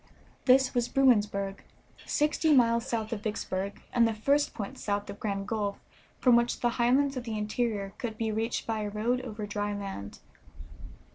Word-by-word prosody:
This 260 0 +5
was 245 -1 0
Bruinsburg, 205 -7 +2 0.5
sixty 305 +1 +2
miles 235 -1 +3
south 225 -1 -2
of 210 - -4
Vicksburg, 200 -2 -3
and 235 -1 +5
the 225 - -2
first 280 +7 +1
point 200 -2 -6
south 205 0 -2
of 200 - -11
Grand 195 -2 -3
Gulf 205 -3 -1 0.4
from 250 -2 +5
which 235 0 +1
the 240 - +3
highlands 255 +4 +2
of 250 - -3
the 225 -2 -4
interior 210 -2 -2
could 225 -3 -4
be 225 -1 -1
reached 225 +2 -2
by 225 -1 -1
a 210 -1 -2
road 230 +5 0
over 215 -4 -6
dry 205 0 -2
land. 195 - -6
220 Hz, 170 wpm, -29 LUFS, 205-245 Hz, 0.5 s, This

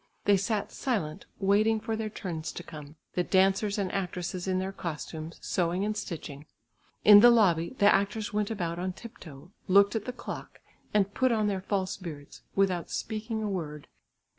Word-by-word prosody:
They 205 - +5
sat 200 +2 -1
silent 200 - -3
waiting 210 +3 +3
for 225 +1 -3
their 220 0 -3
turns 170 -6 -5
to 175 - -7
come; 150 -3 -10 0.2
the 180 - +1
dancers 195 +3 +2
and 195 -3 -1
actresses 180 -1 -3
in 185 -1 +1
their 190 +1 -2
costumes, 160 -2 -6
sewing 180 +2 0
and 215 0 -1
stitching. 155 -7 -6 0.6
In 205 -1 +10
the 240 +3 +9
lobby 190 -5 +3
the 205 - +3
actors 205 +1 +2
went 210 -1 0
about 175 -6 -3
on 185 +1 -2
tip 230 +4 -12
toe, 155 +1 -12 0.2
looked 200 +2 +5
at 220 - -2
the 250 - -3
clock 245 -1 -8 0.3
and 205 -1 +2
put 255 -1 +2
on 220 -2 +2
their 195 -2 -1
false 190 -1 -2
beards, 155 -6 -9
without 185 -3 +1
speaking 220 0 -3
a - - -1
word. 155 -7 -4
195 Hz, 180 wpm, -29 LUFS, 175-210 Hz, 0.6 s, In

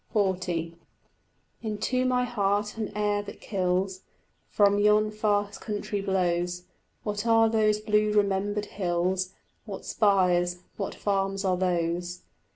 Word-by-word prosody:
XL 200 -3 +3 1.3
Into 225 +4 -1
my 250 -1 +2
heart 210 -3 0
an 220 -2 -3
air 205 -1 +1
that 205 0 -10
kills 185 -1 -1 0.5
From 205 -1 +4
yon 210 +1 +4
far 205 -1 +1
country 205 -1 -4
blows: 180 -2 0 0.4
What 210 +1 -3
are 225 0 +5
those 215 -1 +2
blue 210 0 +2
remembered 205 0 +1
hills, 185 -1 -1 0.3
What - - -7
spires, 180 -3 +2
what 195 - -4
farms 195 -1 -1
are 185 -1 +2
those? 175 0 -1
205 Hz, 120 wpm, -27 LUFS, 185-210 Hz, 1.3 s, are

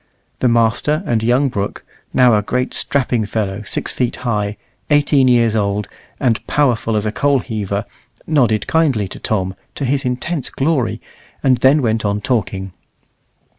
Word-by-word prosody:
The 130 - +2
master 115 +8 +2
and 115 -7 0
young 125 +5 +2
Brooke, 100 -4 -4 0.3
now 125 -3 +5
a 105 - +2
great 125 +5 -2
strapping 125 -6 0
fellow 100 -1 -2
six 105 - -3
feet 125 -2 -1
high, 105 -3 -1 0.3
eighteen 145 -2 +4
years 120 -3 +3
old, 100 -1 0 0.3
and 120 -3 +1
powerful 120 -6 +1
as 105 0 0
a 105 - 0
coal 140 +4 +2
heaver, 105 -4 -3 0.4
nodded 120 -9 +2
kindly 140 -11 +1
to - - -9
Tom, 95 -4 -1 0.2
to 140 - -3
his 135 +2 0
intense 130 +4 -2
glory, 130 -7 0 0.4
and 130 -3 +4
then 135 +3 +4
went 110 -1 +1
on 100 0 0
talking. 100 -5 -2
115 Hz, 155 wpm, -18 LUFS, 105-135 Hz, 0.4 s, now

